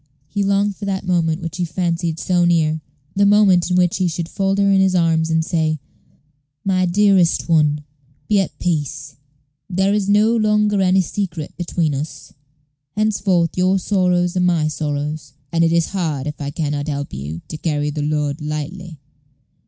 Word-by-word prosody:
He 200 Hz, +5 st, -2 dB
longed 200 Hz, +1 st, +1 dB
for 205 Hz, -, -6 dB
that 190 Hz, -1 st, -2 dB
moment 170 Hz, -2 st, 0 dB
which 165 Hz, +1 st, -5 dB
he 180 Hz, -, -1 dB
fancied 170 Hz, -1 st, -2 dB
so 180 Hz, +1 st, +1 dB
near 160 Hz, -2 st, +2 dB, 0.3 s
the 200 Hz, -, +3 dB
moment 200 Hz, -4 st, +4 dB
in 180 Hz, -, +2 dB
which 180 Hz, -1 st, +2 dB
he 185 Hz, -1 st, +1 dB
should 165 Hz, 0 st, -3 dB
fold 195 Hz, +2 st, -1 dB
her 200 Hz, 0 st, +3 dB
in 195 Hz, -1 st, +4 dB
his 190 Hz, -1 st, +2 dB
arms, 165 Hz, -2 st, +2 dB
and 160 Hz, 0 st, +1 dB
say, 160 Hz, -3 st, 0 dB, 0.9 s
"My 185 Hz, -2 st, +2 dB
dearest 190 Hz, -2 st, +3 dB
one, 150 Hz, -3 st, +2 dB, 0.5 s
be 210 Hz, -2 st, +3 dB
at 195 Hz, -, -2 dB
peace; 145 Hz, -4 st, -3 dB, 0.5 s
there 190 Hz, +2 st, +1 dB
is 205 Hz, -1 st, 0 dB
no 215 Hz, +3 st, +4 dB
longer 210 Hz, -2 st, +2 dB
any 190 Hz, 0 st, +4 dB
secret 175 Hz, -4 st, -4 dB
between 165 Hz, -3 st, -1 dB
us. 145 Hz, +3 st, -6 dB, 0.6 s
Henceforth 200 Hz, -5 st, +1 dB
your 185 Hz, +1 st, +2 dB
sorrows 180 Hz, -2 st, +1 dB
are -, -, +1 dB
my 175 Hz, -4 st, +2 dB
sorrows, 150 Hz, -1 st, -4 dB, 0.2 s
and 165 Hz, 0 st, +2 dB
it 165 Hz, -, +3 dB
is 170 Hz, -1 st, +2 dB
hard 160 Hz, -8 st, -2 dB
if 150 Hz, 0 st, -6 dB
I 140 Hz, -, -3 dB
can 145 Hz, 0 st, -2 dB
not 145 Hz, 0 st, -3 dB
help 140 Hz, -1 st, -4 dB
you 75 Hz, +5 st, -6 dB
to 155 Hz, -, -5 dB
carry 150 Hz, -2 st, -1 dB
the 150 Hz, 0 st, -4 dB
load 150 Hz, 0 st, -1 dB
lightly. 150 Hz, +3 st, -5 dB
175 Hz, 175 wpm, -19 LUFS, 155-190 Hz, 0.9 s, moment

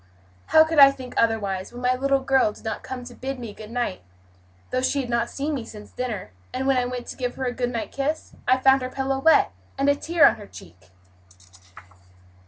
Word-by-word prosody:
"How 315 Hz, -, +7 dB
could 315 Hz, -1 st, 0 dB
I 275 Hz, -1 st, +10 dB
think 260 Hz, -2 st, -8 dB
otherwise, 200 Hz, -5 st, 0 dB
when 245 Hz, +1 st, -9 dB
my 250 Hz, 0 st, +3 dB
little 275 Hz, +1 st, +1 dB
girl 265 Hz, -4 st, +3 dB
did -, -, -16 dB
not 220 Hz, -, -4 dB
come 255 Hz, -1 st, -7 dB
to 245 Hz, 0 st, -10 dB
bid 270 Hz, +2 st, -5 dB
me 235 Hz, -4 st, -7 dB
good 215 Hz, +1 st, -11 dB
night, 240 Hz, -, -3 dB, 0.7 s
though 255 Hz, -, 0 dB
she 280 Hz, +2 st, +1 dB
had 245 Hz, -2 st, -6 dB
not 235 Hz, 0 st, 0 dB
seen 290 Hz, +3 st, -3 dB
me 265 Hz, -5 st, -3 dB
since 210 Hz, -2 st, -11 dB
dinner; 235 Hz, -, -5 dB, 0.2 s
and 260 Hz, +1 st, -3 dB
when 270 Hz, 0 st, +3 dB
I 250 Hz, -, +1 dB
went 245 Hz, -1 st, -5 dB
to -, -, -6 dB
give 250 Hz, -2 st, -3 dB
her 265 Hz, -, -3 dB
a 245 Hz, -, -1 dB
good 245 Hz, -1 st, -1 dB
night 235 Hz, -2 st, -4 dB
kiss 285 Hz, +3 st, -3 dB
I 255 Hz, -, +5 dB
found 265 Hz, +1 st, +4 dB
her 255 Hz, -, -3 dB
pillow 270 Hz, 0 st, -2 dB
wet, 320 Hz, -, +4 dB, 0.3 s
and 275 Hz, -, +1 dB
a 285 Hz, -, +4 dB
tear 330 Hz, +2 st, +3 dB
on -, -, +1 dB
her 205 Hz, -2 st, -11 dB
cheek?" 90 Hz, -, -15 dB
255 Hz, 225 wpm, -24 LUFS, 235-270 Hz, 0.7 s, I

